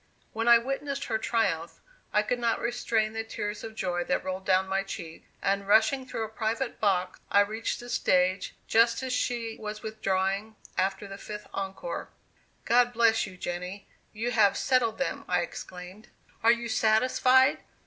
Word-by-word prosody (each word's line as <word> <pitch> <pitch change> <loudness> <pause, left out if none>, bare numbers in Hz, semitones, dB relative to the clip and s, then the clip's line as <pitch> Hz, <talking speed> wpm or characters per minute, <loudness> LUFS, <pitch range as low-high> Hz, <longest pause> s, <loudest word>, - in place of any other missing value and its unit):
When 225 +1 -2
I 235 0 +9
witnessed 275 +3 -3
her 220 -2 -1
triumph, 195 -8 -1 0.3
I 210 - +3
could 245 +3 -1
not 235 -1 +1
restrain 230 -2 0
the 225 0 -2
tears 210 -1 -5
of 220 -1 -7
joy 175 -3 -1
that 180 - 0
rolled 185 0 -4
down 190 0 +3
my 195 +1 0
cheeks; 165 -4 -8 0.2
and 200 0 0
rushing 255 +5 +4
through 230 - -3
a - - -3
private 225 +3 -2
box, 185 -3 +1
I 200 - +5
reached 220 +3 -2
the 245 - -9
stage 185 -4 +1
just 230 +3 +3
as 260 -1 -2
she 235 -2 -1
was 210 0 -6
withdrawing 200 0 -1 0.2
after 195 +2 -1
the 195 0 -9
fifth 210 0 -7
encore. 195 - -4 0.6
"God 245 +1 +4
bless 225 -1 +3
you, 185 -1 -11
Jenny, 180 +3 -5 0.2
you 230 +3 -3
have 215 -4 +4
settled 245 -4 +2
them!" 270 - -2
I - - +2
exclaimed. 185 - -8 0.3
"Are 230 - +6
you 235 0 -1
satisfied?" 255 +4 +4
220 Hz, 170 wpm, -28 LUFS, 195-235 Hz, 0.6 s, I